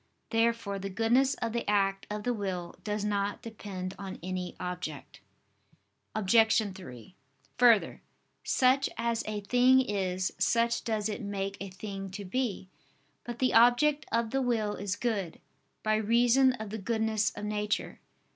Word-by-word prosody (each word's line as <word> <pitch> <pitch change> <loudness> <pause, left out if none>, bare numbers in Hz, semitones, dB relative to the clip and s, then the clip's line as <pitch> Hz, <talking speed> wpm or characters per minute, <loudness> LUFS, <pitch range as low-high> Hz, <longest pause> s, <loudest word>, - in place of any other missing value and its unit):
Therefore 225 -3 +1
the 195 +1 -4
goodness 240 +7 +2
of 230 -1 -3
the 235 -3 -2
act 195 -1 +1
of 210 0 -4
the 245 - 0
will 185 -5 -4
does 210 -1 -2
not 205 +1 -1
depend 195 -5 -6
on 195 -1 -6
any 185 0 -4
object. 180 -5 -6 1.0
Obj. 220 0 +3
3: 130 - -11 0.4
Further, 235 -4 +4 0.4
such 260 +2 +3
as 230 0 -1
a 210 -1 -3
thing 250 +5 +5
is, 190 -6 -1
such 235 +4 +2
does 220 -2 -1
it 215 +3 -4
make 200 -1 -3
a 200 - -5
thing 195 +1 -6
to 200 - -7
be. 205 -1 -2 0.6
But 240 -1 -5
the 255 0 +1
object 265 +6 +4
of 230 0 0
the 270 - +1
will 225 -5 0
is 200 -1 -3
good, 205 -9 -2 0.4
by 215 0 +2
reason 240 +4 +4
of 220 -4 -7
the 220 - -4
goodness 220 0 0
of 205 - -5
nature. 210 0 -2
215 Hz, 150 wpm, -30 LUFS, 195-235 Hz, 1.0 s, thing